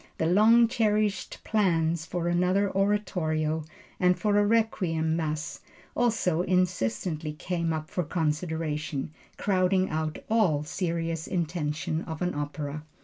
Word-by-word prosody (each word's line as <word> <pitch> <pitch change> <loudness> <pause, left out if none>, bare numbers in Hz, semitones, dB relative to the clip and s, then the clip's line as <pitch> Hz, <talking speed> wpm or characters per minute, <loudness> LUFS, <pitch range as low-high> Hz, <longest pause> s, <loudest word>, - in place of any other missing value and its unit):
The 160 - 0
long 220 +7 +6
cherished 215 -4 0
plans 170 -6 +1
for 175 -1 -2
another 180 +3 +2
oratorio, 175 -6 0 0.4
and 180 0 +3
for 210 -2 +1
a - - +4
Requiem 180 -8 +1
Mass 155 -1 -3 0.4
also 220 -8 +1
insistently 170 -4 0
came 170 +1 -2
up 155 -1 -3
for 180 - 0
consideration, 155 -2 -2 0.3
crowding 185 -1 +2
out 155 0 -2
all 195 -10 +2
serious 165 -1 -2
intention 160 -2 -2
of 160 +1 -4
an 180 - 0
opera. 145 0 -4
170 Hz, 120 wpm, -27 LUFS, 155-190 Hz, 0.4 s, long